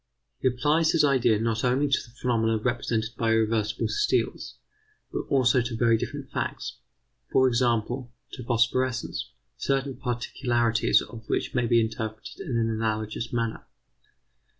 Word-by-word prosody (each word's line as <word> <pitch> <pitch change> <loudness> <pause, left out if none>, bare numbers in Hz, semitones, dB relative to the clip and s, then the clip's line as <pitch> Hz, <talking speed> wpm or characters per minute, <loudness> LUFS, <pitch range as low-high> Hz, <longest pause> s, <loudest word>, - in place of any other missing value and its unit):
He - - +1
applies 150 +6 +2
his 160 -2 +4
ideas 120 -6 +3
not 115 -1 0
only 130 +3 +2
to 135 - +3
the - - -15
phenomena 115 -3 +1
presented 115 -1 -1
by 115 0 +2
irreversible 110 -1 +1
steels, 420 0 0 0.6
but - - -3
also 130 -2 +4
to 120 -1 -3
very 115 -1 +4
different 110 - -5
facts; - - -3 0.5
for 130 - +5
example, 120 0 0 0.2
to 125 - -7
phosphorescence, 120 +1 0 0.3
certain 135 -1 -1
particularities 120 -1 +1
of 115 -2 -11
which - - -1
may 120 -2 +1
be 115 0 +4
interpreted 110 -1 -4
in 150 -12 -2
an 115 -1 +1
analogous 110 0 -2
manner. 115 -2 -2
120 Hz, 140 wpm, -26 LUFS, 115-130 Hz, 0.6 s, for